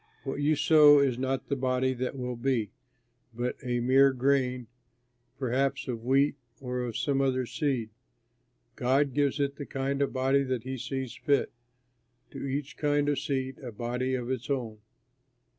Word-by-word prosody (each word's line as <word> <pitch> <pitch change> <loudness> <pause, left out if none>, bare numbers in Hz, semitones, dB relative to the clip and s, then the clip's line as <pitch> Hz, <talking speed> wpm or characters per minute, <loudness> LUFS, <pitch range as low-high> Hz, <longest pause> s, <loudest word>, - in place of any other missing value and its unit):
What 140 +1 -4
you 150 +2 +3
sow 150 -1 +7
is 135 -3 +2
not 130 0 -2
the 140 - 0
body 130 0 0
that 130 +2 -4
will 125 -1 -3
be, 120 -4 -1 0.6
but 120 +1 -2
a 120 -2 -1
mere 135 +2 +5
grain, 130 -1 +1 0.7
perhaps 135 +1 -1
of 115 -3 -4
wheat 135 +3 +2 0.2
or 125 -1 -4
of 120 -3 -3
some 140 -2 +1
other 130 -2 +1
seed. 125 -5 -2 0.8
God 135 +2 +1
gives 145 +1 +1
it 140 0 -1
the 145 - -5
kind 135 +1 -2
of 140 - +1
body 135 +1 +2
that 130 -4 -2
he 130 0 -5
sees 130 0 -4
fit, 140 -3 +1 0.8
to - - -7
each 140 +1 -4
kind 145 -1 +1
of 145 -3 +1
seed 135 -3 -3
a 125 -3 -7
body 125 +4 -2
of 125 0 -3
its 125 0 -4
own. 120 -6 -2
130 Hz, 165 wpm, -28 LUFS, 125-140 Hz, 0.8 s, sow